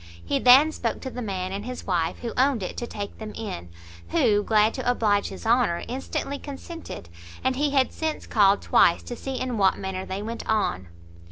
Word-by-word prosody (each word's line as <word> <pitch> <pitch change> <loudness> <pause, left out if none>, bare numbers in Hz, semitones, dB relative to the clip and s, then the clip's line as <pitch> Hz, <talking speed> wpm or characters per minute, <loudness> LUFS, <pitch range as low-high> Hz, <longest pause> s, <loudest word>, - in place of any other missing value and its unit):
He 140 - 0
then 270 +5 +7
spoke 230 -6 -3
to 260 - -5
the 250 - -6
man 190 -4 -3
and 200 +1 -4
his 250 +2 -6
wife 170 -4 0
who 235 - -3
owned 260 -4 +2
it - - -5
to 240 - -3
take 205 -2 -6
them 215 -1 -7
in, 90 - -6 0.4
who, 205 - +3
glad 215 +1 +3
to 260 -2 -2
oblige 210 -4 +2
his 195 - -9
Honour, 225 -7 +2
instantly 270 +2 -4
consented, 290 - -8 0.4
and 260 0 +1
he 290 +2 +1
had 270 -2 +2
since 315 -1 -3
called 200 -2 +3
twice 170 - +4
to 240 - -6
see 265 +1 -5
in 250 -4 -2
what 195 -1 +4
manner 190 -1 -4
they 190 +2 -5
went 230 +2 -5
on. 95 - 0
225 Hz, 200 wpm, -25 LUFS, 195-255 Hz, 0.4 s, then